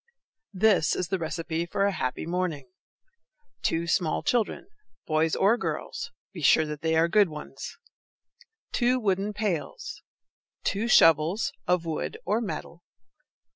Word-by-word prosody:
THIS 200 -4 +3
is 175 - -2
the 190 - 0
receipt 165 +1 -3
for 200 - +2
a 200 - +2
happy 130 -8 -3
morning: 165 -7 -2 0.9
Two 165 +1 0
small 170 -2 0
children, 235 -4 0 0.4
boys 155 0 +1
or 225 +5 +3
girls; - - -4 0.2
be 175 - -7
sure 155 +2 +5
that 150 -1 -6
they 160 0 +1
are 165 +1 +4
good 200 +1 +4
ones! 150 -1 -8 0.9
Two 250 +1 +2
wooden 200 -2 0
pails. 215 - -3 0.6
Two 210 +4 0
shovels, 165 -1 +4
of 180 -1 +2
wood 160 -2 -3
or 210 +5 +1
metal. 170 -3 -6
175 Hz, 135 wpm, -27 LUFS, 160-205 Hz, 0.9 s, sure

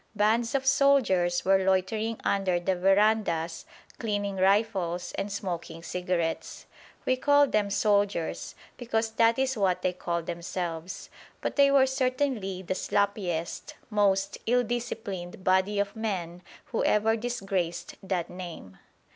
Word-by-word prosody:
Bands 225 +5 +2
of 265 -1 0
soldiers 255 -11 +3
were 190 0 +4
loitering 200 +4 0
under 190 -3 +1
the 185 +2 0
verandahs 195 -3 +2 0.3
cleaning 205 -3 -2
rifles 190 -3 +1
and 200 +1 -4
smoking 175 -4 -5
cigarettes. 175 -1 -3 0.4
We 255 - +2
call 285 +2 +5
them 210 -6 0
soldiers, 200 -4 0 0.2
because 225 -2 -1
that 230 +1 +3
is 265 0 +1
what 190 -4 +1
they 180 - +1
call 170 -1 -3
themselves; 170 +1 -5 0.3
but - - -3
they 280 -1 +6
were 275 -1 +5
certainly 255 -7 -1
the 185 - -2
sloppiest, 190 -4 -2 0.2
most 195 -2 +1
ill 245 +1 +3
disciplined 200 -7 -5
body 190 +2 +2
of 200 0 -1
men 180 -6 -3 0.3
who 230 - 0
ever 220 +1 +3
disgraced 195 -7 -3
that 190 -3 -2
name. 170 - -9
195 Hz, 130 wpm, -28 LUFS, 180-225 Hz, 0.4 s, they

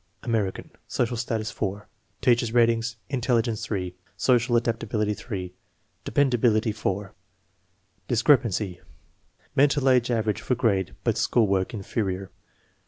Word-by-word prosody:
American, 110 -5 -2 0.2
social 120 0 -1
status 115 -2 -2
4. 100 0 -4 0.3
Teacher's 120 -2 +3
ratings: 115 0 +2
intelligence 120 -4 0
3, 90 -4 -3 0.2
social 120 -1 +3
adaptability 115 -2 -1
3, 95 -5 -6 0.5
de - - -5
pendability 120 -5 +2
4. 100 -2 -3 0.9
Discrepancy: 115 - +2 0.7
Mental 140 0 +3
age 125 -2 +4
average 110 -3 0
for 125 - 0
grade 100 -7 0
but - - +1
school 115 - +3
work 95 -2 0
"inferior." 100 -3 -3
115 Hz, 110 wpm, -25 LUFS, 100-120 Hz, 0.9 s, age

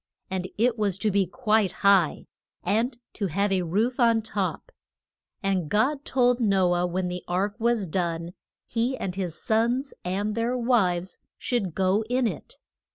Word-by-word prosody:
And 185 -1 -2
it 235 +1 +2
was 200 -3 +1
to 210 +2 0
be 195 -1 +2
quite 215 -2 +1
high, 195 -6 +4 0.4
and 230 +6 0 0.2
to 200 - -2
have 200 +4 0
a 190 -1 +2
roof 210 +10 0
on 230 -2 +4
top. 210 - -3 0.7
And 190 -5 0
God 275 +7 +1
told 245 -1 +2
No 195 -5 +3
ah 175 0 +1
when 180 +1 -2
the 180 0 -5
ark 190 +3 0
was 230 -3 +1
done 170 0 -2 0.3
he 245 +3 -1
and 185 - -3
his 180 -3 -3
sons 235 +5 0
and 200 +4 -1
their 230 +3 0
wives 190 -8 +1 0.2
should 200 -9 -2
go 190 +3 +2
in 250 0 +2
it. 475 - -5
205 Hz, 160 wpm, -26 LUFS, 185-235 Hz, 0.7 s, high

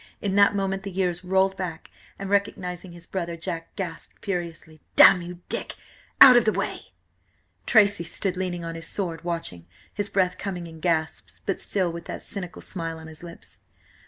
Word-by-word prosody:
In 200 -2 -2
that 205 0 +5
moment 195 -1 -1
the 200 - -6
years 180 -2 -1
rolled 190 +1 +2
back, 180 -4 -6 0.3
and, 195 - -5
recognising 190 -3 -1
his 170 0 -11
brother, 170 -2 -3
Jack 165 -1 -5
gasped 180 -5 -7
furiously: 170 -4 -4
"Damn–you–Dick! 175 -1 +4 0.4
Out–of–the 240 -4 +9
way!" - - -4 0.7
Tracy 205 -6 +5
stood 185 +2 -2
leaning 180 -2 -3
on 165 - -4
his 165 0 -7
sword, 170 -5 -3
watching, 165 - -3 0.3
his 205 0 0
breath 185 -2 +1
coming 180 -4 -4
in 165 -1 -11
gasps, 160 -1 -1
but 195 - -2
still 185 -4 0
with 170 0 -8
that - - -6
cynical 180 -4 -5
smile 165 -3 -4
on 160 - -11
his 160 -1 -10
lips. 170 -1 -11
180 Hz, 160 wpm, -25 LUFS, 165-195 Hz, 0.7 s, Out–of–the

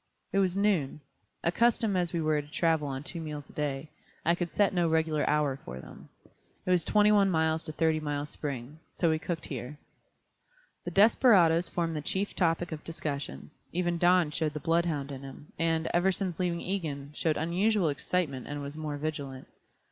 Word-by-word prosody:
It 195 - +3
was 190 -1 +2
noon. 190 -9 +1 0.4
Accustomed 220 +3 +2
as 175 -2 0
we 170 - -1
were 155 -1 +2
to 145 - -15
travel 160 -1 +1
on 135 0 -4
two 170 +3 -5
meals 150 -2 -6
a - - -21
day, 145 0 -3 0.3
I 170 - +4
could 175 -1 -2
set 205 -2 +2
no 175 -2 +2
regular 160 -1 +1
hour 150 -3 +2
for 65 +2 -7
them. - - -12 0.6
It 185 - +1
was 180 -2 +4
twenty 210 0 +4
one 200 -2 +5
miles 160 -2 +1
to - - -3
Thirty 160 0 +1
Mile 145 -1 -2
Spring. 145 -1 -6 0.2
So 170 -2 +2
we 160 - +1
cooked 160 0 -4
here. 130 +1 -6 1.1
The - - -2
desperadoes 195 -6 +5
formed 165 -2 -1
the 150 - -2
chief 190 +7 -2
topic 170 0 +1
of 155 -1 -6
discussion, 150 -3 -5 0.2
even 175 -1 0
Don 175 -3 +4
showed 155 0 -1
the - - -2
bloodhound 165 -4 0
in 135 -1 -6
him, 135 +2 -11
and, 165 -1 +1
ever 175 +2 +3
since 185 -2 -3
leaving 175 -2 0
Egan, 150 -7 -3
showed 155 +1 0
unusual 180 +3 +2
excitement 140 -2 -2
and 145 0 -4
was 140 +1 -5
more 155 -2 -4
vigilant. 145 -3 -5
160 Hz, 185 wpm, -29 LUFS, 150-175 Hz, 1.1 s, one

